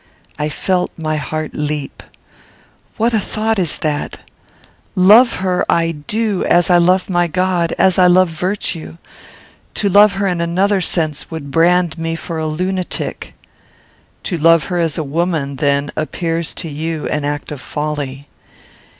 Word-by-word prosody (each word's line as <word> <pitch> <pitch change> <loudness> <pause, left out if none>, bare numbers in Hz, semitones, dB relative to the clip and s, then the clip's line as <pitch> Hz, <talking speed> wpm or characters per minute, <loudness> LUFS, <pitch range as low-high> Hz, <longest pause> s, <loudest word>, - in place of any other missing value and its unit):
I 150 +1 0
felt 180 +4 -1
my 155 -1 -2
heart 155 +2 -4
leap. 150 -1 -4 1.0
"What 230 +2 +1
a 220 - +3
thought 220 +1 -1
is 175 -5 0
that! 150 -2 -3 0.7
Love 215 +7 +6
her 180 -1 +1
I 165 0 +2
do 200 +6 -2
as 175 +1 +3
I 175 - +6
love 180 +2 +3
my 175 -2 +1
God; 180 -1 0
as 190 -1 +3
I 180 - +6
love 180 0 +4
virtue. 170 -1 -3 0.8
To 200 - 0
love 205 +2 +6
her 195 +1 -1
in 180 -3 0
another 190 +4 +1
sense 155 -5 -2
would 155 -4 -7
brand 175 +1 +2
me 165 0 -2
for 165 0 -5
a 155 - -2
lunatic." 185 +4 -3 0.9
"To 175 -4 -3
love 165 +1 +5
her 175 - 0
as 165 -2 0
a 160 - -1
woman, 150 -2 -2
then, 140 +1 +1
appears 165 +1 -2
to - - -5
you 155 +1 -4
an 150 - -1
act 145 +1 -3
of 145 -3 -6
folly." 145 -2 -4
170 Hz, 155 wpm, -17 LUFS, 155-185 Hz, 1.0 s, Love